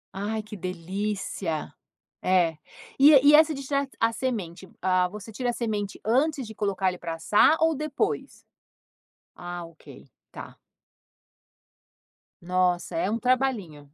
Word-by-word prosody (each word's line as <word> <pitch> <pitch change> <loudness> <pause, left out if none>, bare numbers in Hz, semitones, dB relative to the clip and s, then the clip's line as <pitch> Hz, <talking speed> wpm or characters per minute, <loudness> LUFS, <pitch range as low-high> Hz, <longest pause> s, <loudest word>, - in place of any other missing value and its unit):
Ai, 215 +3 -3
que 215 0 -9
delícia. 185 -2 -4 0.5
É, 175 -4 +2 0.4
e 280 - +8 0.2
e - - +7
essa 315 0 +5
de 275 -1 -6
tirar 280 +1 -1
a 230 0 +2
semente, 195 -8 -4
ah, 185 0 +2
você 210 +3 -9
tira 245 +3 -2
a - - 0
semente 210 -4 -3
antes 270 +4 +1
de 220 - -9
colocar 200 -2 -1
ele 180 -1 -7
para 165 -1 -4
assar, 210 - +4
ou 320 0 +3
depois? 305 +9 -3 0.9
Ah, 175 -1 -6
ok. 165 -1 -15 0.2
Tá. - - -10 1.9
Nossa, 180 - 0
é 330 - 0
um 225 +2 -1
trabalhinho. 235 - -1
205 Hz, 135 wpm, -26 LUFS, 180-255 Hz, 1.9 s, e